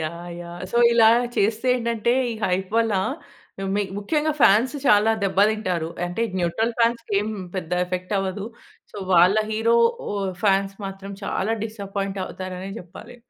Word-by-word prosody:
Yeah! 170 +2 -5
Yeah! 175 0 -9
So, - - -2 0.2
ఇలా 225 -1 +6 0.3
చేస్తే 220 +4 +1
ఏంటంటే, 235 -1 0 0.2
ఈ - - -5
హైప్ 185 +1 -1
వల్ల 225 -2 +1 0.8
మి 205 - +1
ముఖ్యంగా 300 +9 0
ఫ్యాన్స్ 230 +5 +5
చాలా 210 +1 +5
దెబ్బ 190 0 -1
తింటారు. 185 -7 -2 0.2
అంటే 175 +6 -3 0.2
న్యూట్రల్ 205 +7 0
ఫాన్స్‌కి 230 -2 +1
ఏం 210 - -3 0.3
పెద్ద 180 -2 -5
ఎఫెక్ట్ 180 +2 -4
అవ్వదు. 195 +2 -3 0.5
సో, - - -10 0.2
వాళ్ళ 180 +4 +6
హీరో 225 +2 +2 0.4
ఓ - - -3 0.3
ఫ్యాన్స్ 195 -1 +2
మాత్రం 195 +1 -8
చాలా 205 +3 -1
డిసప్పాయింట్ 200 -2 -4
అవుతారనే 185 +1 -6
జెప్పాలి. 195 +7 -12
200 Hz, 145 wpm, -23 LUFS, 185-225 Hz, 0.8 s, ఇలా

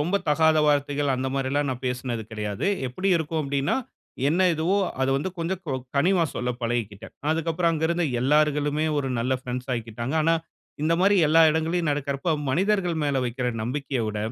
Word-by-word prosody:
ரொம்ப 175 +7 +1
தகாத 160 +1 +4
வார்த்தைகள் 145 -1 +1
அந்த 130 +1 -2
மாரிலாம் 140 +1 0
நான் 125 0 -5
பேசுனது 125 -2 -3
கிடையாது. 105 - -3 0.2
எப்படி 185 +11 -2
இருக்கும் 160 0 -2
அப்படின்னா, 140 0 0 0.5
என்ன 185 +4 +3
இதுவோ 170 +6 +1 0.2
அத 130 - +2
வந்து 165 +7 -2
கொஞ்சம் 175 +2 -2
கொ 135 - -1 0.2
கனிவா 175 +3 +3
சொல்ல 125 +1 -2
பழகிக்கிட்டேன். 115 -3 -3 0.2
அதுக்கப்புறம் 165 +1 +1
அங்க 160 0 -1
இருந்த 170 0 +1 0.2
எல்லாருகளுமே 150 +2 +2
ஒரு 135 -2 -1
நல்ல 125 +3 0
ஃப்ரண்ட்ஸ் 125 +1 -5
ஆய்க்கிட்டாங்க. 115 +4 -4
ஆனா 165 +1 +3 0.5
இந்த 165 +2 +3
மாரி 200 +2 +4
எல்லா 165 +2 +5
இடங்களையும் 160 +1 0
நடக்குறப்ப 145 +3 -2 0.2
மனிதர்கள் 180 +2 +1
மேல 140 -2 0
வைக்கிற 125 +1 -2 0.2
நம்பிக்கைய 135 +1 -2
விட, 105 0 -3
145 Hz, 165 wpm, -25 LUFS, 130-165 Hz, 0.5 s, எல்லா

